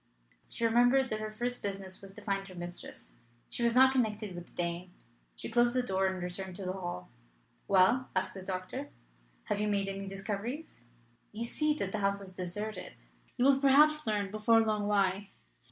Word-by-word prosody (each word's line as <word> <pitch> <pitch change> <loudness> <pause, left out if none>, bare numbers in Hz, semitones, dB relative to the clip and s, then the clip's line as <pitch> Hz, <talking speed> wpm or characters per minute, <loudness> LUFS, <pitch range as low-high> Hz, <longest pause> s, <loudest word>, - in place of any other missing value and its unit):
She 230 - -2
remembered 245 +3 +4
that 215 - 0
her 215 0 -3
first 245 +3 -3
business 195 -2 -5
was 195 -1 -9
to 210 - -10
find 195 -1 -1
her 185 - -11
mistress. 175 0 -8 0.4
She - - -3
was 235 0 +2
not 260 +1 +8
connected 215 -6 0
with 175 0 -8
the - - -22
Dane. 175 +1 -3 0.4
She - - -5
closed 240 +1 +3
the 255 - +2
door 190 -4 +1
and 185 -1 -3
returned 180 +1 -4
to 190 - -6
the 185 - -1
hall. 175 - -6 0.6
"Well," 200 +7 +4
asked 185 0 0
the 190 - -8
doctor, 185 -1 -4 0.5
"have - - -1
you 210 - +1
made 200 -1 +1
any 195 0 -4
discoveries? 205 - -5 0.5
You 220 +2 -3
see 300 +5 +1
that 195 -10 -2
the 215 - -2
house 200 0 +1
is 190 -2 -10
deserted. 210 - -5 0.4
You 245 - +3
will 275 -1 +5
perhaps 300 +1 +5
learn 205 -2 0
before 225 +2 +4
long 215 -2 0
why. 200 -1 +1
205 Hz, 190 wpm, -31 LUFS, 190-235 Hz, 0.6 s, not